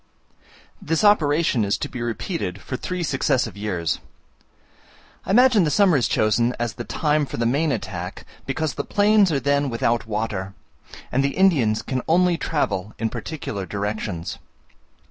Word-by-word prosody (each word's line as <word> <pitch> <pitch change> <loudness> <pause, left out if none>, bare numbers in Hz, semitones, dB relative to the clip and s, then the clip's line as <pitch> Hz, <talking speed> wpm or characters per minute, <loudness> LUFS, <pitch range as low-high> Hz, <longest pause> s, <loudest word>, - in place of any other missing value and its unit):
This 165 +4 0
operation 155 - +3
is 100 0 0
to - - -3
be 125 - -7
repeated 120 - -3
for 130 - -6
three 180 +6 -3
successive 135 -6 0
years. 95 -5 -2 1.3
I - - -7
imagine 235 -1 +5
the 155 - +1
summer 190 +1 +4
is 125 -5 +2
chosen 115 +3 +2
as 120 -3 -1
the - - -6
time 150 -1 0
for - - -6
the 115 - 0
main 145 +6 +1
attack, 90 -7 -5 0.2
because 150 +3 -1
the 140 - -3
plains 205 0 +3
are 140 - +1
then 140 0 +1
without 115 -1 0
water, 105 -3 -3 0.6
and 135 +2 +2
the 140 +3 -1
Indians 140 - +3
can 130 -2 -2
only 175 +1 +3
travel 110 - -2
in 115 0 -2
particular 115 -6 -5
directions. 105 -4 -4
130 Hz, 155 wpm, -23 LUFS, 110-160 Hz, 1.3 s, imagine